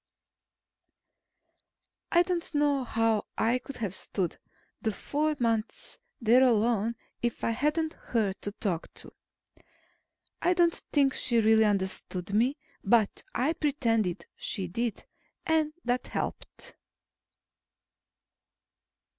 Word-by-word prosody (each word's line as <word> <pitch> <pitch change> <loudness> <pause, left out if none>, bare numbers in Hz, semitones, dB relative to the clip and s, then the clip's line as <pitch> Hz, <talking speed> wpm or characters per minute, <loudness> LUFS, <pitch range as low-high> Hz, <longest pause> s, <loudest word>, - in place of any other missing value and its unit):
I 345 0 +6
don't 345 -3 -3
know 290 -2 +2
how 225 -2 +1
I 235 +3 +2
could 275 +2 -9
have 210 -6 -3
stood 190 -2 -3 0.4
the 220 - 0
four 300 +7 -1
months 230 - -2 0.2
there 240 +2 +5
alone, 230 -2 +3 0.3
if 240 -1 -2
I - - +2
hadn't 300 +6 0
her 215 -5 0
to 205 - -4
talk 180 -6 -3
to. - - -11 1.3
I 360 +1 +3
don't 340 -1 +4 0.2
think 275 -3 +3
she 235 -2 +2
really 220 0 +5
understood 190 -2 -2
me, 245 +7 +2 0.3
but 215 0 +3
I 265 +8 +2
pretended 225 - 0
she 190 -2 -2
did, 230 +5 -3 0.4
and 315 -1 +2
that 245 +1 0
helped. - - -5
235 Hz, 110 wpm, -29 LUFS, 215-290 Hz, 1.3 s, I